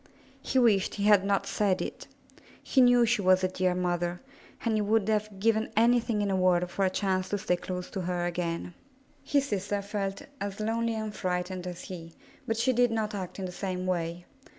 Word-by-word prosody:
He - - -1
wished 220 -6 +3
he 200 - -3
had 205 -2 +6
not 200 0 +1
said 195 -3 +1
it. - - -5 0.6
He 265 - +3
knew 245 -1 +6
she 230 -2 +1
was 185 0 +4
a - - +4
dear 185 -1 0
mother, 175 -1 -1 0.5
and 230 - +2
he 215 - +2
would 210 0 +2
have 210 -2 -1
given 220 +1 +1
anything 230 -2 +3
in 200 - 0
the 195 - +1
world 180 -1 +3
for 195 - -1
a 190 - +3
chance 185 -1 -1
to 205 - 0
stay 180 -2 0
close 180 0 -6
to 190 - -3
her 175 -1 -1
again. 175 0 -3 0.5
His 280 -1 0
sister 205 0 -1
felt 200 -1 -3 0.2
as 200 0 -4
lonely 230 +1 0
and 215 -1 -4
frightened 180 0 -2
as 175 -1 -6
he, 165 -3 -9 0.3
but 225 - 0
she 255 +3 +2
did 245 0 +4
not 220 -2 -1
act 190 -3 -5
in 190 - -4
the 180 - -5
same 185 0 -4
way. 175 -1 -2
195 Hz, 205 wpm, -28 LUFS, 180-220 Hz, 0.6 s, had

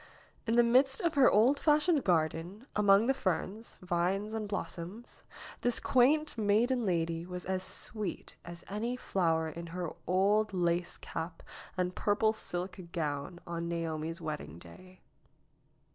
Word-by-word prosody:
In 225 - +2
the 240 - +6
midst 265 +3 +4
of 340 -2 +1
her 275 -3 +6
old 245 +7 +4
fashioned 300 0 +3
garden, 170 +5 0
among 205 +1 +5
the 270 - +3
ferns, 195 +1 -3
vines 185 +4 0
and 220 -1 -3
blossoms, 190 +4 -6 0.4
this 240 -2 +1
quaint 300 +5 +3
maiden 225 +3 +2
lady 165 -2 0
was 180 0 -7
as 185 0 -1
sweet 205 0 -3
as 170 0 -9
any 225 +5 -2
flower 165 -9 0
in 170 +2 -7
her 175 -1 -4 0.2
old 200 +3 +2
lace 175 -1 0
cap 165 0 -6 0.3
and 180 0 0
purple 215 +3 +2
silk 180 -3 -5
gown 150 0 -3
on 170 0 -4
Naomi's 165 0 -3
wedding 155 - -5
day. 185 - -14
185 Hz, 140 wpm, -32 LUFS, 170-225 Hz, 0.4 s, the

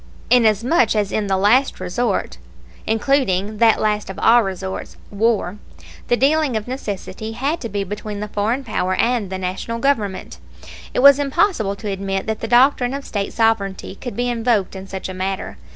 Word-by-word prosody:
Inasmuch 235 - +3
as 205 -2 0
in 210 -2 -1
the 190 -1 +1
last 235 +8 +3
resort, 185 - -2 0.5
including 215 -4 +1
that 225 -2 +5
last 210 -1 0
of 190 - -7
all 235 +1 +5
resorts, 190 -2 -5
war, 210 -2 0 0.5
the 240 - +2
dealing 285 -2 +2
of 215 - -6
necessity 220 -3 -5
had 285 +8 -2
to 230 - -4
be 200 -1 -2
between 210 +1 -6
the 210 - -4
foreign 215 +6 -1
power 185 -5 -1
and 230 -4 0
the 190 - -4
National 185 +5 -4
Government, 230 -7 -1 0.5
it - - 0
was 280 0 +8
impossible 280 - +1
to 210 - -8
admit 195 -1 -2
that 220 -1 -3
the 225 - -4
doctrine 250 +1 +3
of 280 - -6
State 200 -2 -3
sovereignty 215 -5 0
could 240 +2 -7
be 245 +2 -1
invoked 230 -5 0
in 190 0 -8
such 190 -1 -5
a 185 - -6
matter. 190 +1 -4
215 Hz, 175 wpm, -20 LUFS, 195-245 Hz, 0.5 s, was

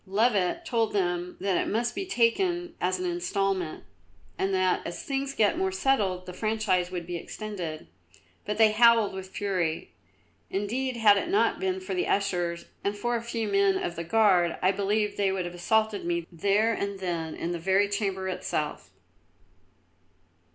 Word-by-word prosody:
Louvet 210 - +1
told 230 -3 0
them 180 -2 -1
that 190 -1 +1
it - - -3
must 235 +2 0
be 390 - -4
taken 350 +6 +1
as 185 +1 +1
an 185 - -3
instalment, 180 0 -1 0.5
and 195 - -1
that 185 -1 +2
as 170 - -6
things 275 0 -2
got 215 - +2
more 380 0 +1
settled 210 - +1
the 180 - -8
franchise 215 -4 0
would 175 -2 -5
be 175 +1 -5
extended; 175 - -6 0.6
but 210 0 -3
they 220 -1 +6
howled 230 -2 +5
with 190 0 -7
fury. 185 -5 -2 0.6
Indeed, 240 +6 -2
had 210 -3 +6
it 340 - -2
not 400 +3 +2
been 380 0 -1
for 375 0 -5
the 365 0 0
ushers 175 -4 0 0.2
and 200 +1 -1
for 240 +3 -1
a 230 - -1
few 230 -1 -3
men 200 -1 +3
of 175 - -3
the 170 - -4
Guard, 185 -3 +3
I 185 - +3
believe 205 +1 0
they 200 -1 +2
would 190 -2 -2
have 175 - -6
assaulted 215 +4 +1
me 170 -1 -1
there 200 +6 +2
and 200 -2 -3
then 170 -4 -3
in 170 - -3
the 175 - -3
very 190 +4 +3
Chamber 195 -2 -2
itself. 155 -4 -3
200 Hz, 170 wpm, -27 LUFS, 180-225 Hz, 0.6 s, they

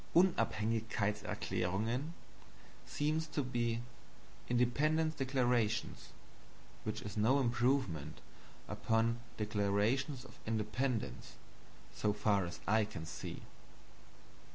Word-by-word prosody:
"Unabhängigkeitserklärungen" 110 - +1 0.7
seems 155 +2 0
to 145 -1 -1
be 120 -2 0 0.7
"Independencedeclarations," 125 -3 +1 0.8
which 110 0 -3
is 105 -1 -6
no 115 +6 +4
improvement 120 - +1 0.5
upon 115 +1 +1 0.2
"Declarations 110 +6 +1
of - - -14
Independence," 110 +2 -1 0.6
so 105 -1 +1
far 100 -3 +2
as 85 0 -7
I 110 +1 +4
can 100 -6 -5
see. 80 - -6
115 Hz, 80 wpm, -36 LUFS, 105-130 Hz, 0.8 s, no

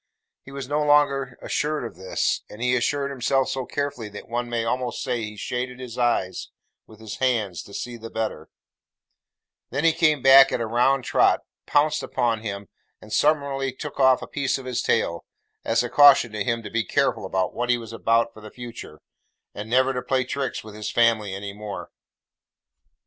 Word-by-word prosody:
He 135 - -13
was 135 -2 -6
no 145 +2 0
sooner 145 -3 +2
assured 150 -1 -1
of 115 - -8
this; 95 0 -1
and 105 - -11
he 125 +1 +2
assured 140 +3 0
himself 135 0 +1
so 130 -2 -3
carefully 140 -6 -3
that 105 - -10
one 120 +1 -3
may 115 -1 -1
almost 125 +1 -2
say 125 -2 -1
he 105 0 -7
shaded 125 +3 -4
his 125 -2 -8
eyes 120 -6 0 0.4
with 110 -1 -16
his 110 -2 -7
hand 115 -9 0
to - - -15
see 120 +3 -5
the 115 0 -9
better; 110 -1 -4 1.2
than 140 +5 -2
he 165 -1 +5
came 155 -5 +2
back 135 0 +8
at - - -1
a 115 - -1
round 125 +4 +2
trot, - - +3 0.3
pounced 150 +1 +2
upon 120 -4 -1
him, 100 -2 -5 0.3
and 110 - -11
summarily 140 -3 +1
took 140 +2 -8
off 130 -1 +4
a - - -7
piece 140 -2 -1
of 135 - -10
his 125 -2 -2
tail; 85 0 0 0.4
as 115 +1 +1
a - - -2
caution 140 -3 +6
to 105 -1 -2
him 115 +2 -1
to - - -8
be 115 0 0
careful - - 0
what 95 +6 -1
he 120 - +4
was 115 -1 -9
about 115 +1 +1
for 110 - -13
the 110 - -10
future, 120 -10 -10 0.5
and 105 +2 -7
never 130 +2 +3
to 125 - -2
play 130 +1 0
tricks 135 +1 -3
with 110 -1 -11
his 105 0 -5
family 115 -4 +2
any 100 0 -6
more. 105 0 -7
120 Hz, 190 wpm, -24 LUFS, 110-135 Hz, 1.2 s, back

